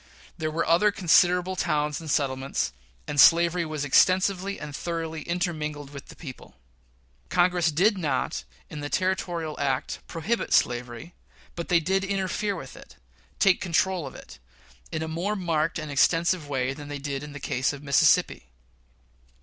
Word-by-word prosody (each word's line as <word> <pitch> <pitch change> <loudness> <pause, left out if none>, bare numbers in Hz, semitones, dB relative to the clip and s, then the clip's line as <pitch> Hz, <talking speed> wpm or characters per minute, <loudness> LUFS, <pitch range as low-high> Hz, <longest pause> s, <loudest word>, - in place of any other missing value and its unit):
There 155 -2 -2
were 160 +2 -1
other 170 +6 +4
considerable 180 -1 +3
towns 150 -3 -1
and 160 - -8
settlements, 135 - -1 0.3
and 145 -2 +4
slavery 170 +3 +5
was 155 -2 -3
extensively 190 +6 +3
and 150 -2 -7
thoroughly 165 -2 -4
intermingled 155 -4 -3
with 140 -1 -10
the - - -12
people. 135 -6 -11 0.7
Congress 175 -2 +2
did 195 +6 +2
not, 140 - -1 0.2
in 150 - -8
the 145 0 -5
Territorial 175 -4 -2
Act, 135 -2 -1
prohibit 200 +8 -2
slavery; 120 +6 0 0.4
but 170 - -6
they 175 - +5
did 190 +4 0
interfere 195 +1 -1
with 135 -7 -9
it - - -14 0.4
take 195 -2 +3
control 180 -2 0
of 130 - -10
it - - -12 0.5
in 160 - -2
a - - -4
more 175 +6 -2
marked 165 -4 0
and 155 -2 -5
extensive 165 +2 +2
way 135 -1 -1
than 145 +1 -10
they 145 0 -5
did 140 -1 -4
in 150 -1 -9
the 145 - -7
case 130 -1 0
of 145 0 -9
Mississippi. 140 - +3
160 Hz, 160 wpm, -26 LUFS, 145-180 Hz, 0.7 s, slavery